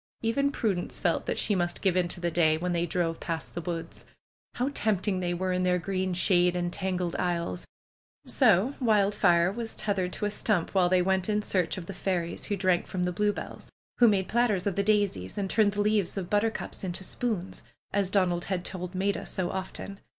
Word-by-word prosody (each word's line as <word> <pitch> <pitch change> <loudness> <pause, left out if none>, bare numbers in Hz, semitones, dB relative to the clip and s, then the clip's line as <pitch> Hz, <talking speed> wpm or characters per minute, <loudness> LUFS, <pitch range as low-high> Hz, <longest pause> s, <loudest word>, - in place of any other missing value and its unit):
Even 280 +5 +1
Prudence 200 -10 -1
felt - - 0
that - - -1
she 210 - +1
must 175 -2 -1
give 190 -3 +2
into 175 -1 0
the 175 -1 -1
day 160 -2 +3
when 180 +2 -2
they 170 0 0
drove 165 -1 -1
past 165 -2 -4
the 175 - -4
woods. 165 -1 -5 0.5
How 255 +3 0
tempting 205 -4 0
they 175 -1 -1
were 185 +1 -1
in 180 - 0
their 180 0 +2
green 185 0 -2
shade 180 -1 +3
and 175 0 -2
tangled 180 -2 -2
aisles! 170 - -2 0.6
So 215 +10 +3
Wild 210 -5 +3
fire 175 -3 +3
was 230 +1 -5
tethered 190 -3 0
to 210 - -3
a 205 - 0
stump 205 -4 +1
while 185 -2 +3
they 185 -1 +3
went 190 +1 +1
in 210 0 +1
search 185 -4 0
of 180 - -6
the 195 - -7
fairies 175 -3 -2
who 205 - -1
drank 185 -2 +1
from 180 -1 -2
the 180 - 0
bluebells; 205 +3 -3 0.3
who 240 - +7
made 195 -3 +2
platters 225 -6 +1
of 200 -3 0
the 200 - +2
daisies 200 - 0
and 200 -1 -1
turned 205 0 +3
the 205 - 0
leaves 205 -2 +1
of 185 -2 -4
butter 210 +2 +3
cups 220 - -6
into 185 0 -4
spoons, 200 -3 -3 0.3
as 200 -2 +1
Donald 180 -3 +1
had 185 -2 -2
told 180 -1 -5
Maida 195 +2 -1
so 180 -2 -2
often. 190 +1 -6
185 Hz, 210 wpm, -28 LUFS, 175-205 Hz, 0.6 s, who